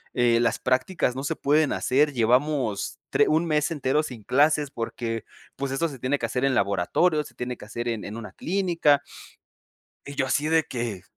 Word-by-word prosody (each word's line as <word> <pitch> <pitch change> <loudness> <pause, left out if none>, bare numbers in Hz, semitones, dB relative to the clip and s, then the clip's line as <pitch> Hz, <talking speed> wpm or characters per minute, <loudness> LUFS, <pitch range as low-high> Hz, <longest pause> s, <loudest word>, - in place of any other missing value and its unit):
eh 120 -2 +3
las 115 -2 +1
prácticas 130 +2 0
no 135 - -4
se 140 - -1
pueden 150 +1 +2
hacer, 145 +3 +2
llevamos 120 -5 +1
tre - - +4
1 160 +2 +2
mes 150 +1 +1
entero 150 -1 +1
sin 125 -7 -8
clases, 145 +5 +2
porque 115 -1 -4 0.3
pues 140 -1 -3
eso 165 +5 +1
se 135 -3 -10
tiene 130 +4 0
que - - -1
hacer 125 +1 -1
en 135 -1 +2
laboratorio, 100 - +2
se - - -14
tiene 125 0 -4
que - - -11
hacer 120 +3 -5
en 115 -2 -3
en 105 +3 -6
una 105 -4 -8
clínica", 170 - +2 1.1
y 140 - -7
yo 135 - +1
así 145 +3 0
de 160 0 +3
que 115 -7 -4
130 Hz, 195 wpm, -25 LUFS, 115-150 Hz, 1.1 s, tre